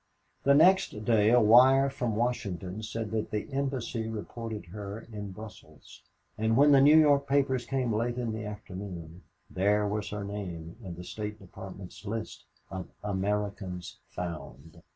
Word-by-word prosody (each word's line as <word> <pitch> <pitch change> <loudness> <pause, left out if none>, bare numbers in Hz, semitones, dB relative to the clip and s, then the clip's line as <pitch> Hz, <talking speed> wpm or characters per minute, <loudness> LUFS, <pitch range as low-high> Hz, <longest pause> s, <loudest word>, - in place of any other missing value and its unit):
The 140 0 +6
next 185 +5 +5
morning 110 0 +3
a 125 - +7
wire 130 +5 +7
from 120 -5 -2
Washington 105 -5 -2
said 110 0 -4
that 110 -1 -2
the 105 - -3
Embassy 130 -4 -2
reported 110 -1 -6
her 105 +1 -6
in 105 -2 -5
Brussels, 105 +1 -12 0.4
and 110 +1 +2
when 145 +1 +6
the 140 -1 +7
New 150 +3 +7
York 145 -2 +5
papers 135 -3 +1
came 130 -3 0
late 120 +3 -1
in 120 -2 -1
the 110 0 -4
afternoon, 95 -5 -7 0.3
there 105 +2 +2
was 105 0 -2
her 105 -1 -4
name 90 -5 -6
in 90 -3 -6
the 90 - -8
State 105 +3 -5
Department's 95 -1 -10
list 110 +1 -5 0.3
of 95 -2 -5 0.2
"Americans 100 -2 -3 0.2
Found." 80 -3 -7
105 Hz, 150 wpm, -29 LUFS, 100-120 Hz, 0.4 s, a